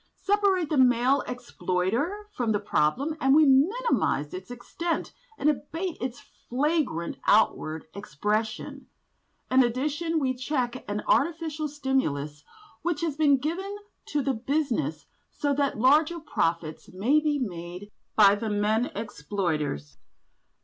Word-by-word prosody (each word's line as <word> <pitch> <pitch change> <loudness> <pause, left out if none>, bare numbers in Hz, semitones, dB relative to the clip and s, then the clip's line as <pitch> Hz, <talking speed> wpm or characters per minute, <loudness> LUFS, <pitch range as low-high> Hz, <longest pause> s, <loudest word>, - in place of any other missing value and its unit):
Separate 395 -4 +2
the 295 - +2
male 255 +2 +4
exploiter 245 - -2
from 235 - 0
the 205 - +1
problem 210 - 0
and 270 +1 +5
we 310 0 +7
minimise 360 - +2
its 370 -6 -7
extent 320 +8 -4 0.2
and 285 - 0
abate 325 +4 -1
its 245 -1 -4 0.3
flagrant 270 - 0
outward 160 -7 +2
expression. 210 +4 -3 0.6
In 260 +1 +6
addition 295 +7 -1
we 265 -4 +1
check 255 -1 -2
an 205 +1 -2
artificial 315 0 +1
stimulus 210 - -2 0.4
which 340 -3 -1
has 325 -4 -1
been 290 -2 +4
given 365 +9 -3 0.3
to 290 -2 -1
the 270 - +1
business 230 - -1 0.2
so 285 -1 -1
that 280 -3 0
larger 300 +8 +4
profits 165 - -2
may 225 +12 +3
be 300 -1 0
made 180 -4 -6 0.2
by 200 -2 +7
the 215 +2 -2
men 215 +3 +1
exploiters." 155 - -3
260 Hz, 125 wpm, -27 LUFS, 205-305 Hz, 0.6 s, we